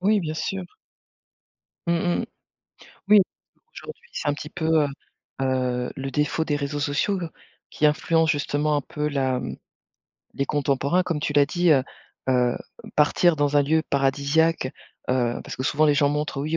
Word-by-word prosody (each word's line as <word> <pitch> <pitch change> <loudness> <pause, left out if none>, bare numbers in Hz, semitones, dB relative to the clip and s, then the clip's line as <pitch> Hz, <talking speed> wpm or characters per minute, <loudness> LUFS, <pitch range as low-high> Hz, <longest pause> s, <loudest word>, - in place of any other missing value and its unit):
Oui, 205 +2 +3
bien 155 -3 -3
sûr. 190 +3 -3 1.2
Mmh 170 - +3 0.3
mh. - - -2 0.8
Oui, 210 0 +8 0.5
aujourd'hui 460 +1 -10
c'est - - -3
un 145 - +2
petit 150 +1 -8
peu, 160 -2 +2
heu - - -1 0.5
heu, 125 -2 0
le 135 0 -4
défaut 150 +2 0
des 150 - -1
réseaux 145 0 -2
sociaux 145 +7 0 0.5
qui 150 - +2
influencent 160 +2 +2
justement 145 +1 0
un - - +1
peu 150 +2 -3
la 130 -3 0 0.9
les 140 - 0
contemporains, 140 +4 +1
comme 170 -4 -2
tu 150 - -1
l'as 145 -1 +5
dit, 175 +2 +2
heu 135 -3 +4 0.5
heu, 125 -1 +2 0.4
partir 155 +3 +4
dans 145 0 +1
un 145 - +5
lieu 160 +3 +2
paradisiaque, 140 +3 +2 0.4
heu, 120 -2 0
parce - - -7
que 130 - -3
souvent, 150 +3 +2
les 145 - +4
gens 145 0 +3
montrent, 150 -2 -2
oui 155 +2 -1
145 Hz, 165 wpm, -24 LUFS, 140-160 Hz, 1.2 s, Oui